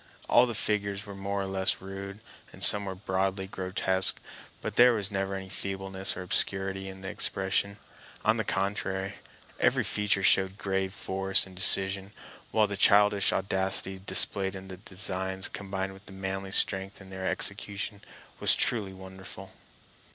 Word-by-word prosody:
All 125 - +5
the 120 - -4
figures 100 -1 -2
were 100 - -9
more 100 0 -3
or - - -4
less 95 +1 +2
rude, 100 +2 -8 0.3
and - - +2
some 105 -1 +9
were 95 -1 -5
broadly 95 0 -2
grotesque, 95 0 +2 0.4
but - - -6
there 125 0 +6
was 105 -2 -3
never 95 0 -2
any 95 0 -6
feebleness 95 0 -1
or 90 - -5
obscurity 95 +1 -1
in 95 0 -11
the 95 - -7
expression. 95 +2 -1 0.5
On 110 +2 +3
the 110 - -1
contrary, 95 -1 -2 0.4
every - - +2
feature 105 -1 0
showed 95 0 +3
grave 95 -1 -2
force 95 0 +1
and 95 -1 -14
decision; 95 +1 +1 0.4
while 110 -1 +2
the 100 -1 -5
childish 100 0 +4
audacity 95 0 0
displayed 95 0 +2
in 95 0 -9
the 95 - -8
designs, 95 -1 -3
combined 95 -1 -5
with 95 +2 -16
manly 95 0 -5
strength 95 0 0
in 95 -1 -14
their 95 0 -5
execution, 100 0 -2 0.4
was - - +5
truly 105 -5 0
wonderful. 95 0 -10
95 Hz, 155 wpm, -28 LUFS, 95-100 Hz, 0.5 s, some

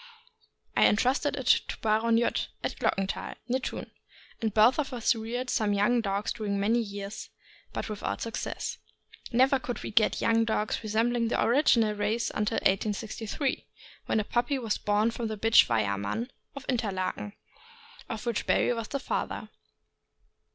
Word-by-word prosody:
I - - +6
entrusted 255 +7 +2
it 265 - -5 0.2
to - - -5
Baron 225 +1 +3
Judd, 235 - +1 0.2
at - - -2
Glockenthal, 195 0 -1
near 255 +1 +1
Thun, - - -5 0.5
and 220 -1 0
both 220 +7 +5
of 275 -3 -1
us 235 -1 +2
reared 240 +3 -4
some 210 -2 +1
young 220 +4 +3
dogs 200 0 -1
during 205 -3 -2
many 220 +4 +2
years, 200 -2 -5 0.4
but - - -4
without 215 -2 -3
success. 230 - -4 0.5
Never 260 +3 +4
could 245 -1 -5
we - - -5
get 215 0 +3
young 230 0 +3
dogs 220 -1 -1
resembling 230 +2 +1
the - - 0
original 235 -4 +4
race 210 +3 -1
until 210 +1 -1
1863, 215 +6 -1 0.4
when - - +2
a - - +1
puppy 240 +6 0
was 225 -5 -2
born 210 +2 +2
from 230 0 -3
the 215 -1 -4
bitch 225 +2 +6
Weyerman, 105 - -1 0.2
of 280 -2 -8
Interlaken, 205 -4 -2 0.8
of 225 +1 -5
which 235 -3 -1
Barry - - +3
was 230 -2 -4
the 275 - -3
father. - - -3
225 Hz, 155 wpm, -28 LUFS, 210-240 Hz, 0.8 s, I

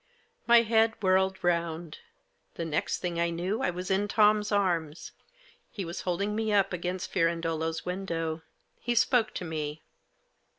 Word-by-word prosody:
My 235 0 +7
head 225 0 +3
whirled 190 0 +2
round. 170 -2 -1 0.6
The 165 - -3
next 155 -2 -1
thing 175 -2 -2
I 170 0 +2
knew 180 +7 -2
I - - +1
was 180 +2 -4
in 200 +2 +2
Tom's 210 0 +3
arms. 175 -6 0 0.6
He 195 - -5
was 170 +1 -5
holding 200 +4 -1
me 220 0 -1
up 195 -2 +2
against 180 +1 -3
Firandolo's 165 -2 0
window. 165 -3 -3 0.4
He 240 - -1
spoke 235 -1 +3
to 180 - -4
me. 155 -1 -4
180 Hz, 145 wpm, -29 LUFS, 165-205 Hz, 0.6 s, My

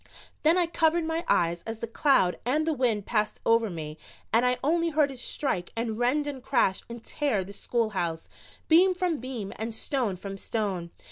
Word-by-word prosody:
Then 320 +3 +4
I 355 - +4
covered 330 0 +2
my 325 +1 -1
eyes 170 0 +2
as 225 0 -4
the 225 - -4
cloud 230 - +2
and 295 +6 +1
the 320 - +1
wind 235 -7 +1
passed 210 -2 0
over 230 -1 +3
me 155 -3 -6 0.3
and 230 +2 +5
I 250 0 +2
only 335 +3 +2
heard 300 -3 +2
it 260 - -8
strike 220 -8 -2
and 225 -1 -2
rend 270 +5 +2
and 280 -3 -5
crash 215 -7 +1
and 235 -1 -8
tear 265 -10 0
the 195 +2 -10
schoolhouse, 195 -8 -2 0.4
beam 365 +3 +5
from 355 -4 0
beam 240 -5 -5
and 220 +1 -3
stone 240 -5 -1
from 195 +1 -7
stone. 195 -7 -2
235 Hz, 190 wpm, -27 LUFS, 200-295 Hz, 0.4 s, and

